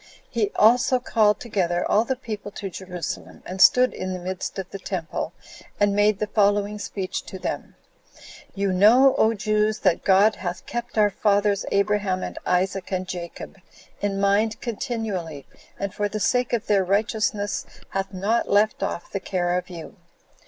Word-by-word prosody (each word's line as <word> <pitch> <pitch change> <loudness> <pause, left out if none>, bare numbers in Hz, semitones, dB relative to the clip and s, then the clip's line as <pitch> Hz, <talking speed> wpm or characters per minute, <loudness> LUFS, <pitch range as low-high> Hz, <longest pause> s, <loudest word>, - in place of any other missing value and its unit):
He 410 - 0
also 245 +3 +4
called 215 -4 +2
together 180 -6 -1
all 220 +2 +3
the 265 - -1
people 215 -5 -6
to 195 -2 -6
Jerusalem, 180 -3 -6
and 185 +1 -4
stood 255 0 +6
in 185 0 -4
the 185 - -4
midst 185 +1 -5
of 190 -2 -4
the 195 - -6
temple, 170 -4 -4 0.5
and 205 -1 +3
made 205 0 +3
the 215 - -1
following 205 0 +1
speech 195 -2 -4
to 190 - -7
them: 185 - -5 0.8
"You 195 -1 0
know, 240 +8 +6
O 225 +1 +3
Jews, 215 +1 +1
that 185 -3 +2
God 200 +3 +4
hath 180 -1 -5
kept 240 -1 -5
our 210 -1 +4
fathers, 205 0 +1
Abraham, 200 -2 +1
and - - -5
Isaac, 185 +1 0
and 185 -1 -2
Jacob, 180 +1 -7 0.4
in 195 -1 -1
mind 210 +3 +2
continually, 205 - -4 0.3
and 200 -1 -4
for 205 0 -1
the 215 +1 -4
sake 250 +4 +1
of 235 -1 -1
their 200 -2 +3
righteousness 205 +1 0 0.2
hath 195 0 -3
not 205 +5 0
left 210 +2 +2
off 170 - -4
the 195 - -2
care 180 -2 -1
of 180 0 -3
you. 170 -3 -9
200 Hz, 165 wpm, -24 LUFS, 185-215 Hz, 0.8 s, stood